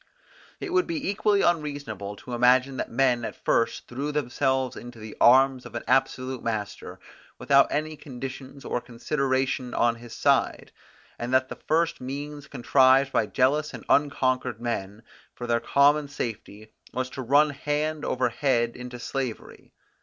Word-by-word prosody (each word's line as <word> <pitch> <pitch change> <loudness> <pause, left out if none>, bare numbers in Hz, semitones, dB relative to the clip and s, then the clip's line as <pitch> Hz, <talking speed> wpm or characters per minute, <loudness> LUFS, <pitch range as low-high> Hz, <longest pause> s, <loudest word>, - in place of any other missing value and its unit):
It 370 - -5
would 360 -1 +3
be 325 -4 -3
equally 205 0 +2
unreasonable 145 - -2
to 125 +4 -9
imagine 125 +2 +3
that - - -3
men 125 -1 +2
at - - -5
first 115 - 0
threw 140 +5 -3
themselves 130 -2 0
into 120 0 -10
the 110 -1 -9
arms 130 +1 +5
of - - -11
an - - -4
absolute 130 -1 +1
master, 110 -3 -4 0.4
without 140 0 +4
any 155 +1 -2
conditions 135 0 -8
or 125 - -2
consideration 130 0 -1
on 120 0 +2
his 120 0 -11
side; - - +1 0.5
and 120 +1 -4
that 130 0 +2
the - - -8
first 165 -1 +1
means 145 +2 -6
contrived 135 +1 +4
by 110 - +1
jealous 145 +6 +1
and - - -10
unconquered 130 -5 +1
men 110 -3 -4 0.3
for 120 - -6
their 120 -1 +1
common 145 +4 +3
safety 110 -5 -6 0.2
was 130 +1 -2
to 135 - -6
run 145 +4 +4
hand 150 +2 -2
over 125 -1 0
head 120 -1 0
into 125 0 -8
slavery. 130 -2 -5
130 Hz, 155 wpm, -26 LUFS, 120-145 Hz, 0.5 s, arms